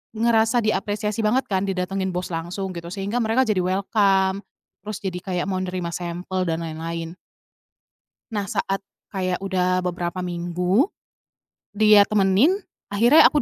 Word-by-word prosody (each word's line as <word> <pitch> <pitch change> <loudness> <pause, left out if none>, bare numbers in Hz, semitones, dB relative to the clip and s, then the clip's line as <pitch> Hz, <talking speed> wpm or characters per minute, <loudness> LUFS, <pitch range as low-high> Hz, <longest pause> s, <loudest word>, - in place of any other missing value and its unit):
ngerasa 225 +1 +3
diapresiasi 210 0 -1
banget 225 +5 +2
kan, 190 +1 +1
didatengin 190 0 -2
bos 180 0 -3
langsung 175 +4 -4
gitu 170 -1 -7
sehingga 200 +6 -2
mereka 230 +3 +2
jadi 215 -6 +1
welcome, 190 +1 +2 0.4
terus 215 +1 -7
jadi 180 -2 -3
kayak 180 -1 -2
mau 185 - -1
nerima 180 -2 -3
sampel 180 +2 -3
dan 165 0 -1
lain-lain. 165 +1 -5 1.2
Nah, 205 -2 -2
saat 195 +2 -1 0.3
kayak 185 -2 -1
udah 185 -1 +1
beberapa 180 0 -3
minggu, 180 - +1 0.9
dia 210 -1 +6
temenin, 210 - +3 0.3
akhirnya 240 +9 +6
aku 295 - +4
190 Hz, 135 wpm, -23 LUFS, 180-210 Hz, 1.2 s, dia